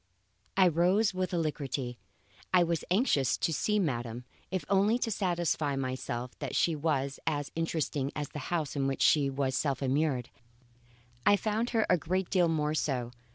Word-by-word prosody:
I 190 -1 +7
rose 180 +6 +3
with 185 0 -2
alacrity. 140 -7 -2 0.5
I 180 -1 +5
was 170 -1 -1
anxious 175 - +2
to 165 - 0
see 210 +9 +1
madam, 120 - -2 0.2
if 185 0 -3
only 200 +4 +3
to 235 -2 -2
satisfy 175 -7 0
myself 130 -2 -3
that - - -4
she 165 - +2
was 140 -3 -1
as 145 -3 -1
interesting 155 -4 -1
as 145 -2 -3
the 150 - -6
house 160 -5 -1
in 135 -1 0
which 135 - 0
she 145 -3 +4
was 135 -1 -1
self 140 -1 0
immured. 135 -2 0 0.9
I 205 - +6
found 220 +3 -1
her 225 -2 +2
a 180 - +3
great 185 +4 -2
deal 180 -3 +4
more 155 -2 0
so. 130 -6 -1
155 Hz, 165 wpm, -30 LUFS, 135-185 Hz, 0.9 s, I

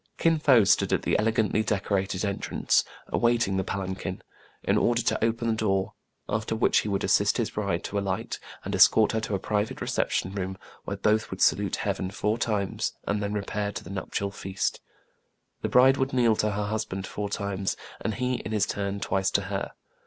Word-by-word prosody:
Kin 165 -1 +3
Fo 130 -7 +6
stood 100 - +3
at - - +1
the - - +1
elegantly 110 0 +2
decorated 100 -2 -1
en 100 -1 -2
trance, - - +1 0.3
awaiting 115 -5 +2
the 95 - +1
palanquin, 95 -1 -4 0.4
in - - +2
order 120 0 +2
to - - 0
open 115 +1 0
the 115 - +2
door, 95 -3 0 0.3
after 110 +1 -1
which 110 - +3
he 105 - -3
would 100 -1 -1
assist - - +3
his - - -1
bride - - -2
to 100 - -2
alight, 95 -2 -3 0.3
and - - -3
escort 110 -1 +6
her 110 - 0
to 105 -2 -2
a - - -1
private 105 +2 -1
reception 95 - -1
room, 95 -1 -3 0.3
where - - -3
both 110 0 +1
would - - -6
salute - - +3
heaven 95 - -2
four 105 +3 -1
times, 105 -4 -1
and 105 0 -1
then 100 0 -2
repair 105 0 -2
to - - -6
the - - -9
nuptial 100 +1 -3
feast. 95 0 -3 0.8
The - - -1
bride 130 +2 +6
would 135 0 -1
kneel 120 -3 +4
to 105 - +1
her 105 0 -2
husband 105 -3 -3
four 105 +1 -4
times, 100 -1 -2 0.2
and 110 - -2
he, 125 -1 0
in 110 - -6
his 105 -2 +2
turn, 100 0 -3
twice 95 0 +1
to 100 - +1
her. 95 - -3
105 Hz, 195 wpm, -27 LUFS, 100-110 Hz, 0.8 s, Fo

